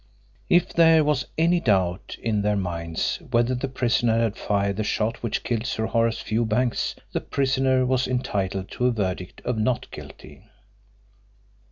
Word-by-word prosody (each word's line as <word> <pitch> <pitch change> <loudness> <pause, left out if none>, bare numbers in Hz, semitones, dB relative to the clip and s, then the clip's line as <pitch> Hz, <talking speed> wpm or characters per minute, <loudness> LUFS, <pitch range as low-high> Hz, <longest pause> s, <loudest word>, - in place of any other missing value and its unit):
If 175 0 +3
there 165 -2 +6
was 145 -3 0
any 170 +2 +3
doubt 95 - 0
in 110 -3 +1
their 105 0 +1
minds 85 -4 -2
whether 120 +2 +2
the 125 +2 -2
prisoner 120 -3 +1
had 115 -2 0
fired 100 -1 -1
the 110 - 0
shot 110 +1 -1
which 115 - -2
killed 120 0 -2
Sir 110 -4 -1
Horace 115 0 +1
Fewbanks 115 +2 0 0.2
the - - -2
prisoner 130 -1 +1
was 130 0 +1
entitled 100 -7 -2
to 125 - 0
a - - +3
verdict 95 -4 -3
of 125 -2 -1
"not 115 +3 -1
guilty." - - -11
115 Hz, 155 wpm, -24 LUFS, 100-130 Hz, 0.2 s, there